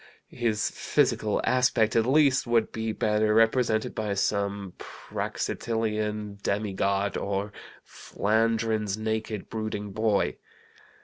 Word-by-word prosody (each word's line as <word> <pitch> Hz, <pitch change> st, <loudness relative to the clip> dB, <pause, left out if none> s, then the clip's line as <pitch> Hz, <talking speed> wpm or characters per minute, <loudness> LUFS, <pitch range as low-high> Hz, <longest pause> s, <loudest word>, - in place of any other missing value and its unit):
His 110 Hz, -3 st, 0 dB
physical 105 Hz, -1 st, +1 dB
aspect, 125 Hz, -4 st, +2 dB
at 115 Hz, 0 st, +3 dB
least, 140 Hz, -1 st, +4 dB
would 115 Hz, -2 st, +2 dB
be 110 Hz, 0 st, -2 dB
better 105 Hz, 0 st, +1 dB
represented 115 Hz, -1 st, +2 dB
by 105 Hz, -2 st, -2 dB
some 100 Hz, -1 st, -1 dB
Praxitilean 105 Hz, -3 st, -3 dB
demigod 100 Hz, -1 st, 0 dB
or 100 Hz, +1 st, -2 dB, 0.3 s
Flandrin's 110 Hz, -1 st, 0 dB
naked, 110 Hz, -1 st, -3 dB
brooding 110 Hz, -2 st, -4 dB
boy. 110 Hz, -1 st, +1 dB
110 Hz, 100 wpm, -27 LUFS, 105-115 Hz, 0.3 s, least